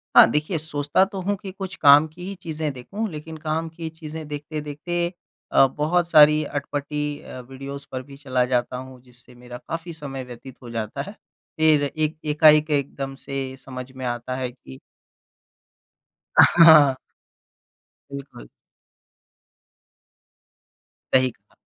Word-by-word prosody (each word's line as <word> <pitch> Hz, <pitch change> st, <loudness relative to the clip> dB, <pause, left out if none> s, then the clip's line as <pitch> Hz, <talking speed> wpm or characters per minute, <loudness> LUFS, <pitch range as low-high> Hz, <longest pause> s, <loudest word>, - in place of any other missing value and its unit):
हाँ, -, -, +10 dB
देखिए 155 Hz, +4 st, -1 dB
सोचता 150 Hz, +2 st, +1 dB
तो 195 Hz, 0 st, -7 dB
हूँ 205 Hz, +2 st, 0 dB
कि 190 Hz, 0 st, -8 dB
कुछ 190 Hz, -1 st, -7 dB
काम 145 Hz, 0 st, +7 dB
की 175 Hz, +3 st, -11 dB
ही 200 Hz, -, -5 dB
चीज़ें 155 Hz, -3 st, -3 dB
देखूँ 200 Hz, -, -5 dB
लेकिन 155 Hz, +1 st, -8 dB
काम 160 Hz, +1 st, -2 dB
की 165 Hz, 0 st, -7 dB
चीज़ें 160 Hz, -1 st, -8 dB
देखते-देखते 150 Hz, +3 st, -4 dB, 0.4 s
अ, 135 Hz, -, +6 dB
बहुत 160 Hz, +6 st, 0 dB
सारी 150 Hz, 0 st, +6 dB
अटपटी 145 Hz, +1 st, -4 dB
अ, -, -, -9 dB
वीडियोज़ 140 Hz, +1 st, -8 dB
पर 130 Hz, -, -4 dB
भी 140 Hz, 0 st, -13 dB
चला 130 Hz, -3 st, 0 dB
जाता 125 Hz, 0 st, 0 dB
हूँ 130 Hz, -1 st, -10 dB
जिससे 125 Hz, 0 st, -17 dB
मेरा 120 Hz, 0 st, -10 dB
काफ़ी 165 Hz, +1 st, -5 dB
समय 140 Hz, -4 st, -6 dB
व्यतीत 125 Hz, +2 st, -12 dB
हो 120 Hz, -, -9 dB
जाता 115 Hz, +3 st, -4 dB
है। -, -, -7 dB, 0.5 s
फिर 155 Hz, -2 st, +4 dB
एक 155 Hz, +2 st, -2 dB
एकाएक 155 Hz, 0 st, +5 dB
एकदम 135 Hz, -1 st, -2 dB
से 135 Hz, -1 st, -4 dB
समझ 130 Hz, 0 st, -8 dB
में 130 Hz, -1 st, -7 dB
आता 120 Hz, +1 st, -3 dB
है 130 Hz, -1 st, -3 dB
कि 65 Hz, -, -14 dB, 1.6 s
हाँ। 155 Hz, -5 st, +7 dB, 1.2 s
बिल्कुल। 140 Hz, -, -9 dB, 2.7 s
सही 130 Hz, 0 st, +5 dB
कहा। -, -, -32 dB
145 Hz, 140 wpm, -23 LUFS, 130-160 Hz, 2.7 s, हाँ